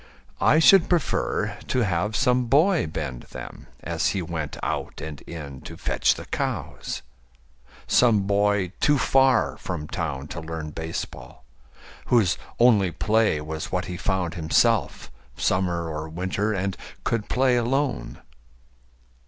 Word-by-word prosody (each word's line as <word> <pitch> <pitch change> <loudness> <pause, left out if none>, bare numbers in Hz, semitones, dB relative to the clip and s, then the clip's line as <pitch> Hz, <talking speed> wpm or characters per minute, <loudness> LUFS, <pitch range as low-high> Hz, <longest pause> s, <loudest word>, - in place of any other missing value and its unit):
I 150 - +5
should 170 +2 +6
prefer 175 -5 0
to 130 - +1
have 100 +3 -1
some 125 -1 +2
boy 155 - +3
bend 75 -6 -5
them - - -9
As - - -1
he 95 - -1
went 80 -3 -4
out - - -3
and 75 -2 -7
in 70 -5 -8
to - - -9
fetch - - +1
the - - -8
cows - - -4 0.8
Some 115 -5 +4
boy 100 -2 +1
too 145 0 +4
far 130 0 +3
from 80 -5 -5
town 75 -6 -4
to 85 - -5
learn 80 -1 -5
baseball, 80 +1 -6 0.6
Whose 110 -8 +3 0.2
only 110 -6 +5
play 105 -3 +1
was 80 +1 -5
what 90 -1 -1
he 90 - -5
found 90 -3 -1
himself, 80 -2 +1 0.3
Summer 90 -2 0
or 80 0 -5
winter, 95 +5 -1
and 95 -1 -1 0.3
could 115 -3 -1
play 130 0 +3
alone. 130 +3 -1
95 Hz, 135 wpm, -25 LUFS, 80-120 Hz, 0.8 s, should